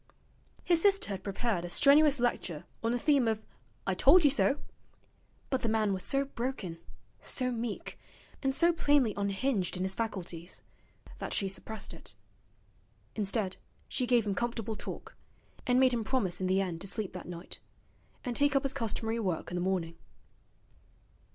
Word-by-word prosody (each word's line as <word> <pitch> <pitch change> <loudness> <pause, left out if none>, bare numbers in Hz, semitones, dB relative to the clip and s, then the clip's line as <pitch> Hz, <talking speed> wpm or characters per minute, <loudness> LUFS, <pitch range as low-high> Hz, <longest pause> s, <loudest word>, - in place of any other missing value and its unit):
His 340 -2 +3
sister 395 - +4
had 195 -2 -4
prepared 200 -2 -1
a 175 - -5
strenuous 290 - +5
lecture 185 -10 -1 0.2
on 230 - +1
the 245 - +1
theme 275 -2 +3
of 220 -1 +1 0.5
'I - - +1
told 365 -1 +6
you 290 - +6
so'; 285 0 +3 0.9
but 265 - +1
the 230 - 0
man 215 -2 +2
was 185 - -3
so 275 0 +1
broken, 235 -10 -4 0.4
so 255 -1 0
meek, 235 -2 -4 0.4
and 270 -1 +1
so 340 +3 +4
plainly 285 -8 +3
unhinged 200 -1 0
in 180 - -1
his 190 0 -1
faculties, 185 -6 -5 0.6
that - - -4
she 195 - +1
suppressed 195 +2 -5
it. 160 -10 -9 1.0
Instead, 200 -2 -1 0.3
she 250 -2 -1
gave 240 -2 +4
him 205 - 0
comfortable 225 0 -2
talk, - - -7 0.5
and 250 0 +4
made 260 -1 +5
him 230 -2 0
promise 215 -7 0
in 185 - +1
the 190 +1 +3
end 175 -3 -3
to 200 - -4
sleep 205 -1 -2
that 180 - -7
night, 175 0 -8 0.7
and 245 -1 -2
take 285 +1 +3
up 275 - +3
his 275 -1 0
customary 225 -2 -2
work 185 -7 -2
in - - -3
the 175 - -1
morning. 180 -3 -1
225 Hz, 170 wpm, -31 LUFS, 190-265 Hz, 1.0 s, told